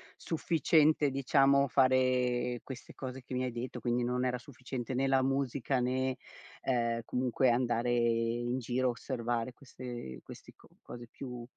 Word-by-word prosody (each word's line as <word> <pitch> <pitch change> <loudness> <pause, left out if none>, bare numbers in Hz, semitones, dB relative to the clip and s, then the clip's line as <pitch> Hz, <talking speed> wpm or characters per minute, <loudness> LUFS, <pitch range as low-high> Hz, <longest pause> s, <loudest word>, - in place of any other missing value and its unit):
sufficiente, 155 -2 +2
diciamo, 140 +1 +4
fare 125 -1 +2
queste 130 -3 -9
cose 130 0 -6
che 130 - -9
mi 125 0 0
hai 125 - -1
detto, 120 +2 -5
quindi 120 0 0
non 125 +1 0
era 125 -1 0
sufficiente 130 -1 -6
né 135 +2 +1
la 135 -1 +4
musica 135 -1 0
né, 130 +1 0 0.5
ehm, 115 -2 0
comunque 125 +1 +1
andare 120 0 +1
in 120 +1 +1
giro, 125 +1 0
osservare 120 -1 -2
queste 120 - -8
questi - - -12
co - - -20 0.2
cose 120 0 -9
più 125 -3 -7
125 Hz, 145 wpm, -32 LUFS, 120-130 Hz, 0.5 s, diciamo